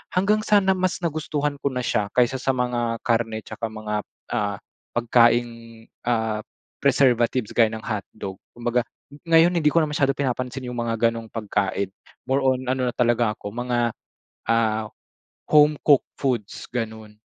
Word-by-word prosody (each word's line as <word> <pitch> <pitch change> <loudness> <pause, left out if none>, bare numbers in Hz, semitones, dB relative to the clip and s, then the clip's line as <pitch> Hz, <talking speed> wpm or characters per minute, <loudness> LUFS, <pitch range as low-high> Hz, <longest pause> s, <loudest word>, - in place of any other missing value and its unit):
Hanggang 200 +4 +3
sa 205 -2 +5
na 190 - +3
mas 185 -1 0
nagustuhan 150 -3 -2
ko - - -1
na 125 -2 -2
siya 105 -3 0
kaysa 125 +1 +3
sa 135 +1 0
mga 120 -2 -1
karne 115 -2 0
tsaka 115 - -5
mga, 110 -1 -3 0.3
ah, 105 -3 0 0.4
pagkaing, 120 0 +4 0.6
ah, 110 -2 +1 0.4
preservatives 120 -3 +2
gaya 115 -2 +4
ng 110 0 -6
hotdog. 100 -3 -5 0.2
Kumbaga 120 0 0 0.4
ngayon, 165 +2 +5
hindi 155 -4 +3
ko 165 - -1
na - - +2
masyado 150 -2 +1
pinapansin 130 -1 -2
yung 125 -1 -5
mga 115 -1 -1
gano'ng 115 -1 -7
pagkain. 105 -3 -1 0.4
More 135 +1 +1
on 130 -1 +1
ano 130 0 0
na 120 - -7
talaga 120 -3 +2
ako 100 - -7
mga, 120 0 0 0.6
ah, 110 -1 +1 0.6
home 150 0 +5
cooked 145 -3 +3
foods 120 -7 -2
ganun. 110 -3 -5
120 Hz, 155 wpm, -24 LUFS, 115-135 Hz, 0.6 s, sa